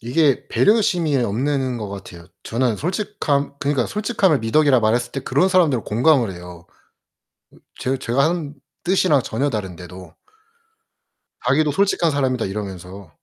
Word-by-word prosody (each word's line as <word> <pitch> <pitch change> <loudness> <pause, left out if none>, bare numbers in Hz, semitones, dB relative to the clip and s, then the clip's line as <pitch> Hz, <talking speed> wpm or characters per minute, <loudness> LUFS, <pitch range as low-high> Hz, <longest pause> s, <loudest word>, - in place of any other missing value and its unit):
이게 135 +4 +1
배려심이 180 -9 +2
없는 130 +3 -1
것 105 -2 -5
같아요. 95 -4 -10 0.2
저는 120 -2 -1
솔직함 175 -6 -2
그니까 140 -4 0
솔직함을 205 - +1
미덕이라 130 +2 +3
말했을 110 +3 0
때 135 - -3
그런 145 +9 +1
사람들은 165 - +2
공감을 120 -1 +2
해요. 90 -1 -11 0.9
음 - - -20 0.2
제 130 +1 -1
제가 130 +2 0
하는 160 -4 -4 0.3
뜻이랑 180 -6 +3
전혀 140 +1 -1
다른데도. 90 -4 -7 1.3
자기도 145 +4 +2
"솔직한 175 -1 +1
사람이다." 130 -4 0
이러면서. 95 -3 -7
130 Hz, 325 characters per minute, -21 LUFS, 105-155 Hz, 1.3 s, 미덕이라